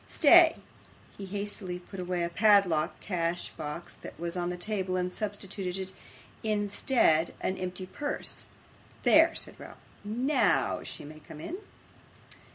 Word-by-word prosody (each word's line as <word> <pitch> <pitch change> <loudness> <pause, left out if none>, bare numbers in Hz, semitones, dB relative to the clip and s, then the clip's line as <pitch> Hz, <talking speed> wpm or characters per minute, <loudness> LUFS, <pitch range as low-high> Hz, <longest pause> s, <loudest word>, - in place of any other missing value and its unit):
Stay.' 335 +1 +7 0.6
He 195 - -8
hastily 200 -2 -3
put 180 +2 -10
away 180 -1 -1
a 170 - -1
padlocked 195 -5 +3
cash 175 -3 -2
box 155 +2 -7
that - - -11
was 170 +1 -2
on 175 -1 -1
the 180 - -4
table, 190 -1 -2
and 180 0 -1
substituted 195 -2 -4 0.5
in 210 -2 0
its 205 - -5
stead 165 - +3
an 185 - -1
empty 185 0 -4
purse. 290 +10 -3 0.6
'There,' - - +6
said - - -4
Ralph. - - -11 0.3
'NOW 245 +8 +1
she - - -7
may 155 +1 -10
come 150 0 -12
in. 340 - -5
185 Hz, 145 wpm, -29 LUFS, 175-205 Hz, 0.6 s, Stay